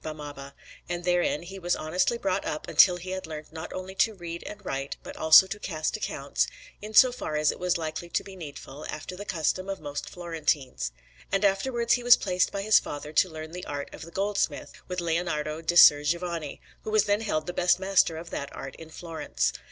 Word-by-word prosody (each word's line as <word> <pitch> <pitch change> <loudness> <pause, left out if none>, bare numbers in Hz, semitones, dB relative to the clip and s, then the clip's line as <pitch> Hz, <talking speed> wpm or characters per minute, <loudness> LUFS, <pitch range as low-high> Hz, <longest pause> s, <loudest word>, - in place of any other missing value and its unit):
Barnaba; 145 -3 -8 0.3
and 175 0 -3
therein 175 -3 +1
he 190 +2 -9
was 175 -1 0
honestly 180 +9 0
brought 195 -5 -1
up 155 - -4
until 180 -2 +6
he 180 +1 -7
had 190 -3 -4
learnt 155 -1 -8
not 160 0 -7
only 185 +1 -6
to 220 +3 +2
read 170 -2 -6
and 205 -1 -9
write 135 -4 -3
but - - -9
also 160 +3 +8
to 210 +3 -6
cast 155 -6 -2
accounts, - - -1 0.3
in 215 +1 -8
so 255 +3 +8
far 200 -10 -4
as 150 0 +3
it - - -10
was 180 0 +1
likely 160 +1 -5
to - - -1
be 195 - -11
needful, 150 -3 -9
after 155 +4 -6
the 205 +2 -8
custom 185 +1 -1
of 195 - -3
most 145 -1 -5
Florentines. 150 - -2 0.4
And 195 +1 +2
afterwards 235 +4 +2
he 245 - +1
was 245 0 +8
placed 185 -2 +1
by 200 -1 -3
his 215 +1 +6
father 150 +1 -7
to 185 +4 +4
learn 155 -1 -8
the 180 +1 -7
art 145 -1 -5
of - - -10
the 165 - -8
goldsmith 200 +3 -1 0.2
with 180 -1 -3
Leonardo 160 -2 -1
di 165 +1 -1
Ser 145 -4 +9
Giovanni, 170 -1 -2 0.2
who - - -6
was 215 -1 +4
then 205 +1 +1
held 155 -8 -1
the 175 - -4
best 180 0 +3
master 190 -4 +3
of 170 +1 -8
that 140 - -4
art 135 - -7
in 160 -1 -11
Florence. 165 0 -2
175 Hz, 215 wpm, -27 LUFS, 155-190 Hz, 0.4 s, Ser